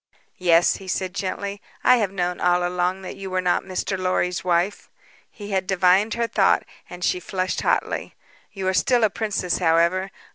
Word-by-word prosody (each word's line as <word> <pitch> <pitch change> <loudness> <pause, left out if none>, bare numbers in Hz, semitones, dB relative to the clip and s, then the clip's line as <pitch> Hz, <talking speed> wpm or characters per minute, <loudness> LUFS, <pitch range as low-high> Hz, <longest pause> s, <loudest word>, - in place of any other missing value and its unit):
"Yes," 175 -1 +4
he 190 - -12
said 185 0 -2
gently; 200 +1 -4 0.2
"I 250 - +6
have 210 -5 0
known 180 -2 -2
all 175 0 +2
along 180 +1 -1
that - - -7
you 195 -1 -6
were 185 0 -1
not 180 -1 +1
Mr. 190 0 -3
Lorry's 185 -1 0
wife." 180 +2 0 0.4
He 205 -1 -9
had 190 -1 0
divined 190 +3 +3
her 235 0 0
thought - - +2 0.3
and 180 0 -8
she 180 - +1
flushed 185 0 -2
hotly. - - -1 0.4
"You 190 -2 -4
are 190 - +2
still 245 +4 +2
a 215 - +3
princess, 205 -5 -2
however. 170 +3 +2
185 Hz, 180 wpm, -23 LUFS, 180-195 Hz, 0.4 s, I